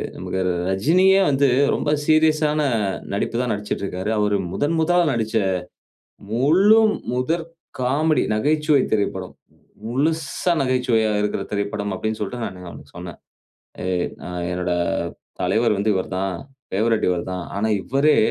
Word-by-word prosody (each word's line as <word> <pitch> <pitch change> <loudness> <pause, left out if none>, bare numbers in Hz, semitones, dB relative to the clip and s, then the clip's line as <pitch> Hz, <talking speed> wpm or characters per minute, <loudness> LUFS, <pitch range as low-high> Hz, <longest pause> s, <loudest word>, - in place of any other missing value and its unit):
நமக்கு 95 - -3 0.3
ரஜினியே 180 - +4
வந்து, 140 0 +3 0.3
ரொம்ப 145 - -2 0.2
சீரியஸான 155 -1 +3 0.6
நடிப்பு 100 - -2
தான் 125 -2 -1
நடிச்சிட்ருக்கிறாரு. 100 -1 -4
அவரு 105 -1 +2 0.2
முதன் 150 +3 0
முதலா 175 +2 +3
நடிச்ச 110 -1 -2 1.0
முழு 180 - +5 0.3
முதற் 160 +7 -1 0.3
காமெடி, 150 +5 +2
நகைச்சுவை 150 +4 +2
திரைப்படம். 105 -2 -1 0.5
முழுஸ்சா 150 +7 0
நகைச்சுவையா 125 -4 +1
இருக்கிற 105 0 -1
திரைப்படம் 100 0 -2
அப்டின்னு 110 +3 -3
சொல்ட்டு 120 +4 -4
நானு 90 -1 -8
அவனுக்கு 75 -4 -12
சொன்னேன். 90 -1 -8 0.7
எ - - -2 0.4
அ - - -6 0.2
"என்னோட 90 0 -2 0.7
தலைவர் 105 +5 +2
வந்து 100 +2 +1
இவரு 95 - -2
தான். 95 -1 -1 0.4
ஃபேவரட் 110 +3 +1
இவர் 90 0 -1
தான். 90 -1 -4
ஆனா, 105 +2 0
இவரே 140 +4 +2
115 Hz, 125 wpm, -22 LUFS, 100-150 Hz, 1.0 s, முழு